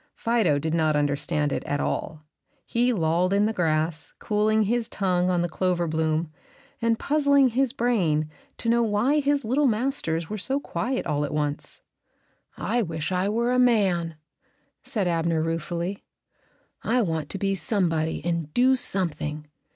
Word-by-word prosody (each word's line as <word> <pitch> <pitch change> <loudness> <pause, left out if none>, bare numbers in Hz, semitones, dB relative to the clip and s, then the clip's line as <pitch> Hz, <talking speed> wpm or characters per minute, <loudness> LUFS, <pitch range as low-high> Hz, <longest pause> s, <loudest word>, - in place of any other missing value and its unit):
Fido 225 -11 +1
did 155 +2 -2
not 155 -2 +2
understand 145 0 0
it - - -2
at 145 - -1
all. 155 +1 -3 0.4
He 245 +1 +1
lolled 175 -1 +1
in 200 +1 +3
the 220 - 0
grass, 160 -3 -1
cooling 215 +1 +1
his 235 +2 -1
tongue 180 -4 0
on 175 -1 +1
the - - 0
clover 175 0 0
bloom, 160 0 -1 0.5
and 230 -1 +2
puzzling 280 -2 +3
his 255 +1 +1
brain 190 - +1 0.3
to - - -5
know 235 +1 +3
why 235 +7 +2
his 285 -2 +1
little 270 +6 +2
masters 215 - -1
were 215 +3 -5
so 270 +9 +1
quiet 255 +2 -3
all 150 0 0
at 145 - -3
once. 150 -1 -3 0.8
"I 240 - 0
wish 160 -4 -3
I 185 +2 +1
were 235 +3 0
a 250 - +2
man," 190 -9 +2 0.7
said 205 -6 -2
Abner, 165 -1 +1
ruefully. 170 +4 -3 0.8
"I 245 +1 +1
want 160 -5 -2
to - - -3
be 195 +1 0
somebody 170 -6 -1
and 170 -3 -2
do 260 +2 +5
something. 155 - -2
185 Hz, 160 wpm, -25 LUFS, 160-235 Hz, 0.8 s, do